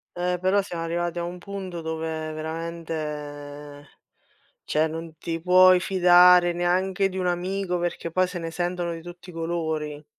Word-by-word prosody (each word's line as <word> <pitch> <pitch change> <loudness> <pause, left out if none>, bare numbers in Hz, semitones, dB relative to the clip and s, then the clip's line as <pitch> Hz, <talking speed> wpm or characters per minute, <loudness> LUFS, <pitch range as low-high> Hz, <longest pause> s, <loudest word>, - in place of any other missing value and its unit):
Eh, 180 0 -1
però 190 +2 +3
siamo 175 -4 -5
arrivati 175 +1 -2
a - - -2
un 175 +1 -5
punto 190 -2 -6
dove 160 -1 -4
veramente, 150 -3 -6 0.8
cioè 155 +1 +1
non 165 0 -7
ti 165 +2 -4
puoi 185 +1 +6
fidare 180 -1 +6
neanche 185 +2 +1
di 190 0 -6
un 180 -1 0
amico 180 +1 -1
perché 175 -1 -3
poi 185 +2 +2
se 180 -1 -6
ne 165 0 -4
sentono 175 0 -2
di 165 - -7
tutti 175 +2 -11
i - - -13
colori. 160 -3 -3
175 Hz, 160 wpm, -25 LUFS, 160-180 Hz, 0.8 s, puoi